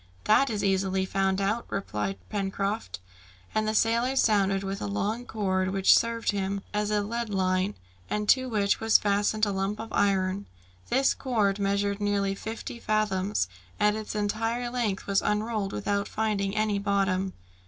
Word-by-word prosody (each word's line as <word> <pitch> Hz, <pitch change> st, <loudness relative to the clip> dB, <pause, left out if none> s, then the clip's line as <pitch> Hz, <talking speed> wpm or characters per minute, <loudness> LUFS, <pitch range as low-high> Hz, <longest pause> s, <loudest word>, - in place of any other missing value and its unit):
"That 270 Hz, +6 st, +4 dB
is 210 Hz, -3 st, -2 dB
easily 190 Hz, -1 st, +1 dB
found 195 Hz, 0 st, 0 dB
out," 210 Hz, +4 st, -1 dB
replied 105 Hz, -, -3 dB
Pencroft. 200 Hz, -, -2 dB, 0.6 s
And 215 Hz, 0 st, +1 dB
the 215 Hz, -, 0 dB
sailor 235 Hz, +4 st, +2 dB
sounded 200 Hz, -5 st, +3 dB
with 195 Hz, 0 st, -4 dB
a -, -, -2 dB
long 215 Hz, -, -2 dB
cord, 190 Hz, -3 st, 0 dB
which 195 Hz, 0 st, +5 dB
served 230 Hz, 0 st, +1 dB
him 195 Hz, 0 st, -2 dB
as 210 Hz, 0 st, 0 dB
a 210 Hz, -1 st, +1 dB
lead 235 Hz, +2 st, -3 dB
line, 185 Hz, 0 st, 0 dB, 0.3 s
and 210 Hz, 0 st, -1 dB
to 260 Hz, -1 st, +4 dB
which 205 Hz, -3 st, +1 dB
was 225 Hz, 0 st, +5 dB
fastened 205 Hz, +1 st, +1 dB
a 205 Hz, -, -1 dB
lump 195 Hz, +2 st, -2 dB
of 225 Hz, 0 st, -7 dB
iron. 195 Hz, 0 st, +1 dB, 0.4 s
This 270 Hz, +1 st, +3 dB
cord 210 Hz, -6 st, 0 dB
measured 200 Hz, +1 st, 0 dB
nearly 200 Hz, -1 st, +1 dB
fifty 225 Hz, +3 st, -6 dB
fathoms, 210 Hz, -, 0 dB, 0.3 s
and 210 Hz, 0 st, +3 dB
its 215 Hz, -1 st, -5 dB
entire 225 Hz, +3 st, -1 dB
length 230 Hz, -6 st, -1 dB
was 200 Hz, -1 st, +2 dB
unrolled 210 Hz, -1 st, -1 dB
without 205 Hz, -1 st, -1 dB
finding 210 Hz, -2 st, -1 dB
any 215 Hz, -1 st, +1 dB
bottom. 195 Hz, -2 st, 0 dB
205 Hz, 160 wpm, -27 LUFS, 195-215 Hz, 0.6 s, which